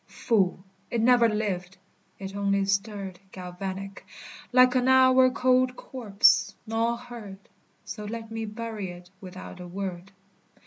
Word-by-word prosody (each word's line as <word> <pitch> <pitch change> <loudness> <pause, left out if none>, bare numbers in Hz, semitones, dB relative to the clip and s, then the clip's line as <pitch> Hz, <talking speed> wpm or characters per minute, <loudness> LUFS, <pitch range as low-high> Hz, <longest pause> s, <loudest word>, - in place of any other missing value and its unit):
Fool! 190 -6 0 0.3
It 235 - -1
never 235 0 +5
lived. 190 -4 -3 0.4
It 195 0 -7
only 200 -1 +1
stirred 200 -2 -2
Galvanic, 190 +2 -6 0.5
like 255 0 +6
an 255 -1 +2
hour 260 0 +6
cold 255 0 +2
corpse. 220 -8 +2
None 230 +1 0
heard: 235 -5 -10 0.5
So 210 -1 -7
let 225 +1 -6
me 225 0 -3
bury 215 -2 -5
it 175 +1 -11
without 185 -1 -9
a 180 - -8
word. 185 0 -6
210 Hz, 130 wpm, -27 LUFS, 190-235 Hz, 0.5 s, like